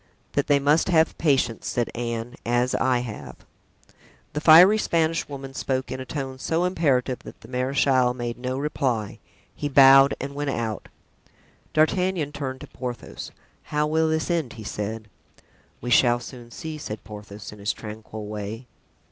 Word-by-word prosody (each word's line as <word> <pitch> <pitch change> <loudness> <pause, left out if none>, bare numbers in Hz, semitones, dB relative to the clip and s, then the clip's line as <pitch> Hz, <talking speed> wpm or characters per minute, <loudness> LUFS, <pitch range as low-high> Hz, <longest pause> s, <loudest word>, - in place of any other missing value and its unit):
"That 140 - 0
they 145 - +5
must 145 +5 +2
have 160 -2 +3
patience," 135 -7 +1
said 120 -1 -1
Anne, 120 0 -4
"as 120 +1 +1
I 125 -2 +2
have." 115 -4 -7 1.0
The 150 - -2
fiery 180 +7 +8
Spanish 165 -4 0
woman 135 -1 -7
spoke 130 -1 -2
in 130 - -4
a 130 - -6
tone 135 -2 -5
so 165 +5 0
imperative 140 -8 +1
that - - -12
the - - -13
marechal 130 0 +2
made 120 -1 -4
no 130 +1 -3
reply; 130 -7 -2 0.4
he 145 - -3
bowed 135 0 +7
and 140 +1 -5
went 145 0 -2
out. 115 -5 -3 0.8
(D'Artagnan 165 -1 +2
turned 135 -3 -5
to - - -8
Porthos. 125 -2 -7 0.4
"How 150 0 0
will 160 +1 +2
this 160 +2 0
end?" 160 -8 -1
he 110 - -9
said. 105 +1 -4 0.7
"We 120 - -4
shall 120 0 +5
soon 120 -1 -10
see," 155 +5 -7
said 110 -7 -6
Porthos, 105 0 -9
in 105 - -12
his 100 +1 0
tranquil 110 0 -8
way.) 105 +3 -6
130 Hz, 160 wpm, -24 LUFS, 120-150 Hz, 1.0 s, fiery